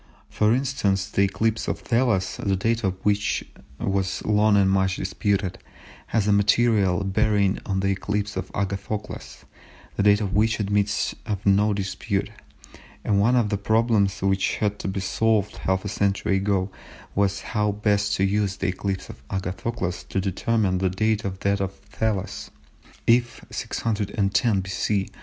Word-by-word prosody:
For 105 0 +2
instance, 120 -7 +1
the 100 - 0
eclipse 110 +3 0
of - - -1
Thales, 115 -6 +1
the 100 -2 0
date 115 +4 0
of 95 -1 0
which 105 0 +1 0.4
was 95 -1 -1
long 105 0 +4
and 100 -1 +4
much 95 0 +2
disputed, 95 -1 -1 0.5
has 105 -2 0
a - - +4
material 100 -2 +3
bearing 100 0 +2
on 95 -1 0
the 95 - +1
eclipse 100 +2 -2
of 95 0 -4
Agathocles, 100 +2 -4 0.5
the - - +2
date 105 0 +5
of 100 -3 -2
which 110 +2 +2
admits 105 0 0
of 105 -1 -3
no 100 +2 +4
dispute; 100 +1 -2 0.7
and 100 -2 +2
one 115 +5 +4
of 115 -4 +2
the 100 -1 -1
problems 110 -3 +2
which 95 0 +1
had 105 -1 -1
to - - -4
be 95 0 -2
solved 105 +1 +1
half 95 +1 -1
a - - -1
century 100 -1 +1
ago 95 -1 0 0.4
was 100 0 +1
how 105 -1 +2
best 100 0 +1
to 95 - 0
use 100 0 +1
the 95 -1 -1
eclipse 95 +1 -3
of - - -11
Agathocles 95 -1 -3
to 95 - 0
determine 95 0 0
the 95 0 +1
date 110 +3 0
of 95 -1 -5
that 100 0 +1
of 95 -1 -2
Thales. 105 -1 -3 0.6
If 120 +1 +2
610 105 -1 0
B.C. 95 +1 -1
100 Hz, 155 wpm, -24 LUFS, 95-105 Hz, 0.7 s, date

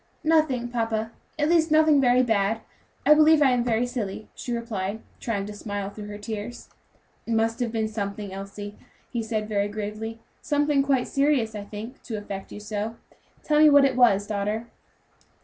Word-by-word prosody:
"Nothing, 310 -6 +2
papa; 225 -2 -2 0.3
at 295 -1 +1
least, 330 -1 +3
nothing 310 -2 +5
very 250 0 +4
bad; 220 -1 +1 0.4
I 300 - +8
believe 310 +1 +6
I 280 -3 +5
am 245 -1 +2
very 235 0 +1
silly," 220 -4 -5
she 245 - -6
replied, 220 -3 -3 0.2
trying 205 -4 -2
to 210 - -7
smile 205 -1 -4
through 210 0 -8
her 205 0 -7
tears. 215 +3 -6 0.6
"It 230 - 0
must 225 +1 +1
have 240 -2 -1
been 220 -1 0
something, 205 -2 -4
Elsie," 200 +1 -7 0.4
he 235 - -1
said, 220 -1 -2
very 205 -1 0
gravely; 215 +2 -5 0.2
"something 290 -1 +2
quite 275 -2 +1
serious, 275 -6 +1
I 205 -1 -6
think, 220 +5 -8
to 225 -3 -5
affect 200 -2 -7
you - - -7
so; 210 +1 -4 0.5
tell 300 -1 +2
me 305 0 +8
what 285 -1 +7
it 265 -2 +1
was, 215 -5 +4
daughter." 210 +2 -2
225 Hz, 180 wpm, -25 LUFS, 205-255 Hz, 0.6 s, I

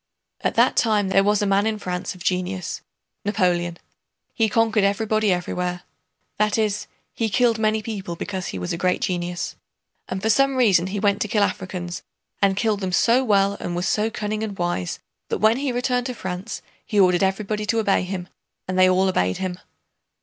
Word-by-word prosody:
At - - 0
that - - +4
time 210 -4 +2
there 195 0 +4
was 210 +1 +2
in 200 - +1 0.3
France 210 - -13
a 180 +1 -3
man - - -12
of 175 - -11
genius—Napoleon. 180 -1 -2 0.6
He 225 -1 +2
conquered 220 -1 +2
everybody 215 +1 +2
everywhere—that 180 +4 -3
is, 210 -2 0 0.3
he 225 -1 -1
killed 230 +1 +2
many 215 0 +1
people 195 -6 -5
because 190 +1 -4
he - - -5
was 90 -1 -3
a 170 - -4
great 180 0 +1
genius. 175 -1 -2 0.5
And 190 - -2
for 220 +3 +2
some 275 +3 +3
reason 195 -8 +4
he 200 +2 -3
went 200 0 +1
to - - +1
kill 210 0 +2
Africans, 185 -2 -3 0.4
and 195 -1 +3
killed 215 -2 +1
them 190 -2 -2
so 235 +8 +4
well 200 -3 +3
and 175 - -4
was 175 +1 -1
so 210 +5 +1
cunning 215 -1 -3
and 205 -3 -5
wise 175 - -2 0.3
that - - 0
when 220 +2 +4
he 275 -1 -1
returned 245 0 0
to 250 - -4
France 185 -2 -5 0.2
he 210 - 0
ordered 180 -2 +4
everybody 210 +2 -1
to 230 - +1
obey 205 -3 +2
him, 180 -1 -4 0.4
and 185 0 -1
they 185 0 +7
all 185 +1 +3
obeyed 90 - +1
him. 185 -1 -4
195 Hz, 185 wpm, -23 LUFS, 180-215 Hz, 0.6 s, they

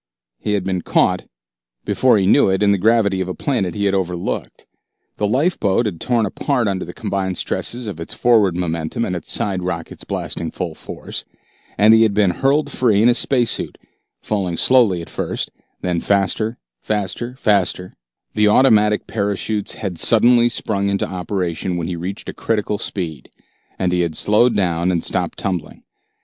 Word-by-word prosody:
He 105 - -2
had 100 -2 0
been 95 -1 -2
caught, - - +1 0.6
before 130 -4 +3
he 95 - +1
knew 95 - +4
it, 95 +2 +1
in 100 - +4
the 100 - +1
gravity 105 -2 +2
of 95 - -2
a 90 - -4
planet 105 -11 -1
he 100 -1 -1
had 100 - +2
overlooked. 90 -2 -3 0.5
The 105 - 0
lifeboat 125 - +1
had 95 -6 -4
torn 120 -3 +1
apart 125 +3 -1
under 95 -2 -1
the - - -7
combined 95 -2 -3
stresses 120 +1 -3
of 100 -6 -6
its 85 - -5
forward 105 -7 +3
momentum 85 +5 -2
and 90 - -3
its 85 - -3
side 95 -3 0
rockets 85 -2 -5
blasting 85 - -3
full 90 -4 -5
force, - - -6 0.5
and 105 +2 +6
he 115 - +6
had 110 -3 +3
been 100 -3 +3
hurled 140 - +1
free 110 -6 +2
in 120 - +6
his 120 - +3
space 125 -4 +2
suit, - - -2 0.4
falling 95 -5 -2
slowly 110 -9 +4
at - - -12
first, - - -3 0.3
then 90 -2 -1
faster, 100 +4 0 0.2
faster, 105 +4 -3
faster 95 -6 0 0.4
The 105 0 +3
automatic 105 -2 +4
parachutes 105 0 -2
had 95 -6 -5
suddenly 120 +1 +4
sprung 100 -4 -2
into 100 0 0
operation 90 -1 -3
when 85 - -3
he 90 +1 -3
reached 90 +5 -6
a - - -5
critical 105 -2 -1
speed, 80 -9 -5 0.5
and 90 -1 0
he 90 - +1
had 85 -2 -2
slowed 115 +4 +4
down 85 -2 +1
and 85 -2 -1
stopped - - 0
tumbling. 90 -6 -4
100 Hz, 175 wpm, -19 LUFS, 90-110 Hz, 0.6 s, and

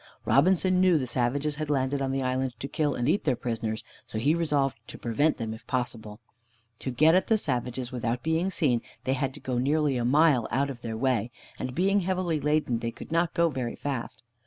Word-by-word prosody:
Robinson 185 +5 +3
knew 185 -3 +5
the 135 - -1
savages 140 +5 0
had 155 -1 -3
landed 140 0 0
on 135 -1 0
the 135 0 -1
island 130 -1 -1
to 140 - -4
kill 150 -2 0
and 120 0 -1
eat 180 +7 +2
their 130 -5 +2
prisoners, 115 -2 -3 0.2
so - - -5
he 140 +8 +3
resolved 145 -5 +1
to - - -9
prevent 145 +7 +1
them 110 -2 -3
if 110 - -12
possible. 115 -4 -3 0.6
To - - -4
get 155 +6 +4
at 185 - +3
the 220 - +4
savages 125 - -2
without 120 -1 -2
being 160 +4 +1
seen, 130 -11 +1 0.2
they 130 - +1
had 135 0 -1
to - - -10
go 125 -3 -2
nearly 145 +1 +1
a 120 - -1
mile 140 -1 +4
out 140 +4 0
of 120 -3 -10
their 115 -2 -4
way, 120 -2 +1 0.3
and 125 0 -4
being 195 +3 +3
heavily 180 -3 0
laden 150 -5 +1
they 115 - -2
could 115 - -10
not 170 0 +1
go 170 0 +3
very 130 -5 -3
fast. 135 -3 -5
135 Hz, 215 wpm, -27 LUFS, 120-155 Hz, 0.6 s, knew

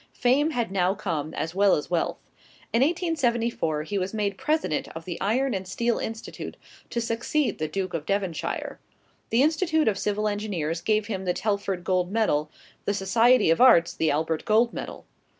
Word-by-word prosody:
Fame 265 +5 +2
had 240 -9 -2
now 190 0 +1
come, 160 -7 -3
as 165 - -3
well 195 +1 +4
as 150 - -5
wealth. 170 - 0 0.6
In 230 - +3
1874, 240 - 0
he 200 +5 -2
was 190 +3 -3
made 205 -2 -1
President 300 - -1
of 165 0 -7
the 175 -2 -6
Iron 250 +6 +1
and 190 -1 -4
Steel 235 +4 0
Institute, 225 0 -6 0.3
to 235 - -2
succeed 235 +5 -1
the 155 - -1
Duke 185 +1 -3
of 160 -2 -4
Devonshire. 195 -5 -2 0.5
The 235 +4 +3
Institute 315 0 +2
of 200 -3 +1
Civil 210 +1 0
Engineers 185 -6 -2
gave 215 +3 +1
him 195 -3 -4
the 180 - 0
Telford 200 -4 -1
Gold 185 0 0
Medal; 155 -9 +1 0.4
the 205 - 0
Society 225 +1 +4
of 165 - +2
Arts, 175 -10 +6
the 160 - 0
Albert 155 +2 0
Gold 230 +2 +3
Medal. - - -7
205 Hz, 175 wpm, -26 LUFS, 175-235 Hz, 0.6 s, Arts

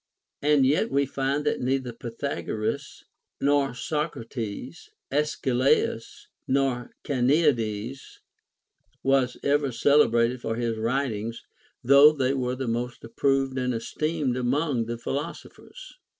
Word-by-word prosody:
And 145 -2 +4
yet 155 - +2
we 140 0 +2
find 140 +2 -1
that - - 0
neither 130 -1 -1
Pythagoras 115 -2 -4 0.4
nor 140 -2 +2
Socrates, 130 - -4 0.2
Arcesilaus 135 -4 0 0.2
nor 130 -2 0
Carneades, 130 -4 0 0.9
was 135 -2 +2
ever 140 -1 +2
celebrated 120 -2 +3
for 115 -1 -2
his 115 -1 -2
writings, 115 -2 -2 0.4
though 140 +4 +8
they 135 -2 0
were 125 -2 -1
the 130 -1 -4
most 120 +1 -3
approved 135 +2 0
and 125 -1 -1
esteemed 150 +3 -2
among 135 +3 0
all 115 - 0
the 120 +1 -4
philosophers. 170 - -7
130 Hz, 110 wpm, -26 LUFS, 120-140 Hz, 0.9 s, though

